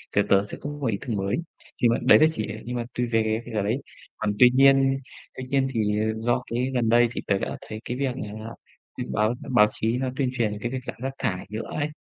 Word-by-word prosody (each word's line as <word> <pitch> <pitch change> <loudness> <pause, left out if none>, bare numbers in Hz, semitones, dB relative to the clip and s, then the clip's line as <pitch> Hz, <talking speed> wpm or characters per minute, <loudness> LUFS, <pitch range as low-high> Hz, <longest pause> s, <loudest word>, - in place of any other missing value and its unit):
thì 100 - +5
tớ 100 0 +5
sẽ 105 - -7
có 145 - -4
một 145 -3 -3
ý 105 - 0
tưởng 115 - -1
mới. 100 +1 0 0.5
Nhưng 120 - +5
mà - - +2
đấy - - +7
là 155 - +7
chỉ 110 -8 -3
để 105 +1 -6
nhưng 125 - -4
mà 120 -1 -2
tùy 125 - 0
về 110 -1 +1
cái 120 - -9
giờ 105 - +1
đấy. 110 +6 0 0.4
Còn 105 -1 -1
tuy 125 -1 +9
nhiên 135 0 +5 0.4
tuy 130 - -4
nhiên 135 -1 +2
thì, 105 -2 +1
ờ, 110 - +1
do 120 +3 +1
cái 125 +3 0
gần 120 -3 +1
đây 120 +1 +5
thì - - -4
tớ 100 - +2
đã - - -4
thấy 110 0 -6
cái 120 - -3
việc 130 -2 -1
là 105 -5 -5 0.6
thì - - -2
báo 110 +2 +2 0.2
báo 105 -1 +7
chí 115 +3 -1
nó 130 0 -1
tuyên 130 -2 0
truyền 105 -4 -1
cái 120 - -2
việc 130 -1 -4
giảm - - -6
rác 135 +1 -2
thải 95 -7 -2
nhựa 110 +2 -4
ấy. 150 0 0
120 Hz, 265 wpm, -25 LUFS, 110-130 Hz, 0.6 s, tuy